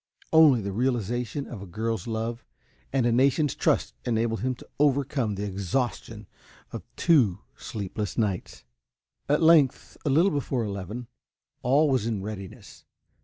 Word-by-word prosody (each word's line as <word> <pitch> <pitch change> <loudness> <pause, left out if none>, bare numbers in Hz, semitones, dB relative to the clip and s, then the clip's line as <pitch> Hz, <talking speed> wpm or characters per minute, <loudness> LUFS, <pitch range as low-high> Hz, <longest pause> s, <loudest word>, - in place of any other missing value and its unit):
Only 155 -7 +7
the 100 0 -4
realization 120 +4 -1
of 110 -6 -8
a 100 - -8
girl's 110 +2 -3
love 115 +1 -3 0.5
and 130 -3 +1
a 120 - +3
nation's 135 +4 +3
trust - - +1
enabled 115 -1 0
him 130 +4 -1
to - - -15
overcome 135 -6 +1
the 100 +1 -3
exhaustion 100 +5 -3 0.5
of - - -6
two 115 - +3
sleepless 105 -1 -5
nights. 100 - -2 0.7
At 150 +3 +3
length, 160 -5 +4
a - - 0
little 165 +8 +4
before 135 -4 -1
eleven, 105 +3 -5 0.6
all 140 +5 +3
was 130 -5 +1
in 105 -4 -2
readiness. 100 -2 -9
120 Hz, 140 wpm, -26 LUFS, 105-135 Hz, 0.7 s, Only